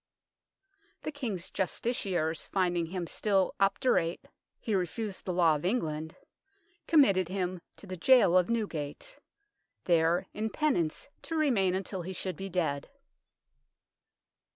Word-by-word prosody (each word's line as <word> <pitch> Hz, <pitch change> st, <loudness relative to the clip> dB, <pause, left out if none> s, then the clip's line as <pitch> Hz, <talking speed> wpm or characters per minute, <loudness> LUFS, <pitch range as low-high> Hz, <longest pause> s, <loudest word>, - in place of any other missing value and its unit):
The 310 Hz, -, -3 dB
King's 225 Hz, -, -4 dB
justiciars, 185 Hz, -5 st, -1 dB
finding 175 Hz, -3 st, +1 dB
him 180 Hz, 0 st, -4 dB
still 195 Hz, +1 st, +1 dB
obdurate 195 Hz, -3 st, +2 dB, 0.2 s
" -, -, -57 dB
he 220 Hz, -, -3 dB
refused 195 Hz, +2 st, -2 dB
the 185 Hz, -, -1 dB
law 170 Hz, -3 st, +4 dB
of 150 Hz, -, -5 dB
England 160 Hz, -6 st, -2 dB, 0.4 s
" 400 Hz, 0 st, -39 dB
committed 200 Hz, -, +4 dB
him 185 Hz, -2 st, -2 dB, 0.2 s
to -, -, -12 dB
the 185 Hz, -1 st, -6 dB
gaol 200 Hz, -2 st, +5 dB
of 180 Hz, +1 st, +4 dB
Newgate, 215 Hz, -, -3 dB, 0.6 s
there 170 Hz, 0 st, +2 dB
in 220 Hz, +1 st, -2 dB
penance 210 Hz, -, 0 dB
to 330 Hz, -, -5 dB
remain 225 Hz, -, +2 dB
until 190 Hz, 0 st, -3 dB
he 185 Hz, +2 st, -6 dB
should 185 Hz, 0 st, -3 dB
be 195 Hz, 0 st, -6 dB
dead. 160 Hz, -6 st, -1 dB
185 Hz, 130 wpm, -30 LUFS, 170-220 Hz, 0.6 s, gaol